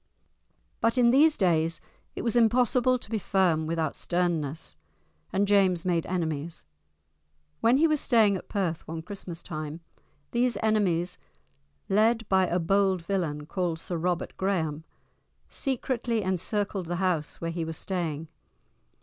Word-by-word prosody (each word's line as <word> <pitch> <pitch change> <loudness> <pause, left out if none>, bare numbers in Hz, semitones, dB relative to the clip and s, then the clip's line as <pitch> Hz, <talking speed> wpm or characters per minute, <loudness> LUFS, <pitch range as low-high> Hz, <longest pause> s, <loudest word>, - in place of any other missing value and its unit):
But 230 +2 +1
in 240 -1 +5
these 300 +4 +5
days 165 -3 +2 0.4
it - - -4
was 230 -1 0
impossible 245 +2 +4
to 235 - -11
be 220 - 0
firm 175 -6 +1
without 160 -2 -1
sternness, 160 - -1 0.6
and 200 - +2
James 190 -4 +3
made 170 -3 0
enemies. 165 -3 -3 0.9
When 235 +3 +4
he 325 +3 +5
was 305 -2 +1
staying 220 -5 +4
at 185 - -7
Perth 180 -5 -2
one 160 0 -5
Christmas 180 -2 -7
time, 155 0 -6 0.5
these 245 0 +1
enemies, 185 -5 +1 0.7
led 225 +2 +2
by 190 -1 +4
a 175 - 0
bold 190 +1 +2
villain 165 -6 -2
called 175 0 -2
Sir 175 +2 -5
Robert 175 +1 -2
Graham, 160 -5 -1 0.6
secretly 245 -4 -1
encircled 190 0 -2
the 175 - -2
house 175 -4 -1
where 165 0 -3
he 165 0 -3
was 160 -1 -5
staying. 165 -5 -3
185 Hz, 140 wpm, -27 LUFS, 165-215 Hz, 0.9 s, in